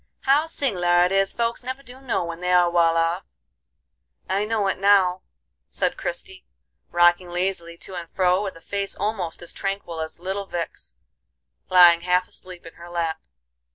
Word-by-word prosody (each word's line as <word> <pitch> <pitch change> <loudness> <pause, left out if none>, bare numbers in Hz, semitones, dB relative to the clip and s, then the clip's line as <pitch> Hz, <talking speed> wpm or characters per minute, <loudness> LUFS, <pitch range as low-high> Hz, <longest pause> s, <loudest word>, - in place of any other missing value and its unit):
How 285 +4 +3
sing'lar 180 - +2
it 180 - -1
is 195 0 +2
folks 235 +1 -2
never 260 +2 -5
do 255 0 -13
know 230 -8 -1
when 170 0 -7
they 180 0 -1
are 175 -1 +4
wal 165 -1 +3
off!" 165 +2 0 1.0
"I 195 +2 0
know 215 -2 0
it 190 - -1
now," 190 -2 +4 0.5
said - - -1
Christie, 380 -7 -6 0.5
rocking 175 +1 +3
lazily 175 -1 -3
to 190 - -10
and 175 -2 -6
fro, 185 0 +2
with 195 -4 -4
a 165 - -14
face 200 +1 -3
almost 190 -6 -3
as 170 - -6
tranquil 195 -4 -4
as 160 +1 -5
little 195 +2 -4
Vic's, 170 -2 -6 0.7
lying 175 -2 +7
half 180 +1 +1
asleep 180 -2 -12
in 165 - -11
her 175 - -10
lap. 170 -2 -2
180 Hz, 170 wpm, -23 LUFS, 175-200 Hz, 1.0 s, lying